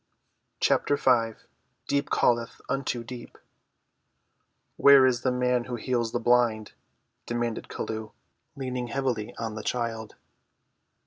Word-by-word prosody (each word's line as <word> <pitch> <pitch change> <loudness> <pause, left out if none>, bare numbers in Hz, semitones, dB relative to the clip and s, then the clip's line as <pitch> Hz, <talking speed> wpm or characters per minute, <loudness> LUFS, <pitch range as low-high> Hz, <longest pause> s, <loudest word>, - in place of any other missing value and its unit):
CHAPTER 145 - +2
V 115 -5 +2 0.5
DEEP 140 0 0
CALLETH 120 -1 +1
UNTO 135 -3 -2
DEEP 120 0 -10 1.4
"Where 140 -2 +7
is 125 -2 +2
the 130 - +1
man 125 -1 +1
who 125 - -4
heals 120 -1 -1
the 120 - -1
blind?" 120 -2 +2 0.6
demanded 120 -1 -2
Chelluh, 110 -1 -5 0.5
leaning 125 -2 -3
heavily 120 -4 -2
on 115 -1 -4
the 110 - -5
child. 115 -2 -3
120 Hz, 115 wpm, -27 LUFS, 115-125 Hz, 1.4 s, Where